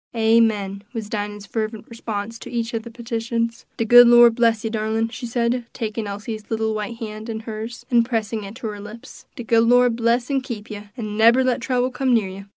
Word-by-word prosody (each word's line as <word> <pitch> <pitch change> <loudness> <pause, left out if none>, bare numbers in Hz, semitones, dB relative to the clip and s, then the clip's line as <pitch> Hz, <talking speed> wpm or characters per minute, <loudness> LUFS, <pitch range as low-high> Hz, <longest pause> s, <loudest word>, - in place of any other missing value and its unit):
"Amen!" 220 -3 +2
was 220 -3 -5
Dinah's 205 -1 -4
fervent 220 0 -4
response 225 -1 -5
to - - -9
each 235 -1 -3
of 225 - -1
the 235 - -10
petitions. 230 0 -3
"De 230 - 0
good 245 +1 +9
Lord 240 -1 +7
bless 230 -1 +2
you, 225 - -2
darlin'," 220 +1 -1
she 240 +1 -6
said, 235 +1 0
taking 220 -1 -4
Elsie's 210 +2 -6
little 220 -1 -1
white 215 +2 -4
hand 215 0 -7
in 220 -1 -4
hers, 225 +1 -7
and 235 -1 +5
pressing 225 -2 -2
it 200 +2 -9
to 235 -2 -5
her 205 -1 -7
lips; 210 +3 -11
"de 245 - -6
good 230 0 +3
Lord 245 0 +4
bless 235 +3 +1
an' 270 -1 +1
keep 235 -5 -7
you, 205 0 -8
an' 210 -3 -5
nebber 230 +4 +5
let 255 -1 0
trouble 250 0 0
come 255 -1 +1
near 210 -4 +1
you. 195 +1 -9
225 Hz, 215 wpm, -22 LUFS, 215-235 Hz, -, good